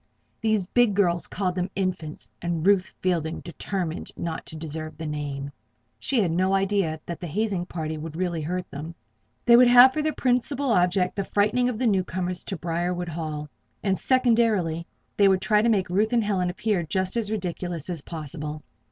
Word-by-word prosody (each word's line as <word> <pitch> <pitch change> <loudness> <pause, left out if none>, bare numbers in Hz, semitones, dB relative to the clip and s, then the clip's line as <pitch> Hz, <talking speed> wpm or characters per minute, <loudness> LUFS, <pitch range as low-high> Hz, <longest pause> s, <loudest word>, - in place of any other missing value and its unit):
These 215 -3 +1
big 230 +1 +3
girls 175 -4 +2
called 185 -1 -1
them 180 +1 -2
"Infants," 180 -5 -3
and 170 -1 -2
Ruth 195 -2 +3
Fielding 170 -3 -1
determined 175 -1 -4
not 165 -1 -4
to - - -6
deserve 155 0 -5
the 160 - -6
name. 145 -2 -4 0.5
She 265 - 0
had 170 - 0
no 185 +3 +2
idea 195 -5 +1
that 170 - -5
the 175 - -5
hazing 190 +1 -1
party 155 -3 -4
would 155 0 -7
really 175 -2 -1
hurt 180 +4 -3
them; 160 +4 -7 0.5
they 235 - +8
would 250 +1 +8
have 245 +2 +8
for 305 - 0
their 310 +1 +1
principal 260 +1 +1
object 180 -1 +2
the 200 - -1
frightening 215 +6 +2
of 240 - -3
the 250 - -1
new 195 -5 +3
comers 180 0 -3
to 190 - -4
Briarwood 175 +1 -2
Hall; 155 -2 -4 0.4
and, 195 -2 +1
secondarily, 225 -10 +2 0.3
they 200 - +6
would 190 -1 +4
try 210 +1 +3
to 235 - +2
make 200 -5 +2
Ruth 205 +6 +1
and 235 -2 +3
Helen 190 -4 0
appear 195 +1 0
just 185 +4 -1
as 225 -3 -1
ridiculous 180 -5 -3
as 175 -5 -3
possible. 150 -1 -6
180 Hz, 185 wpm, -25 LUFS, 165-210 Hz, 0.5 s, they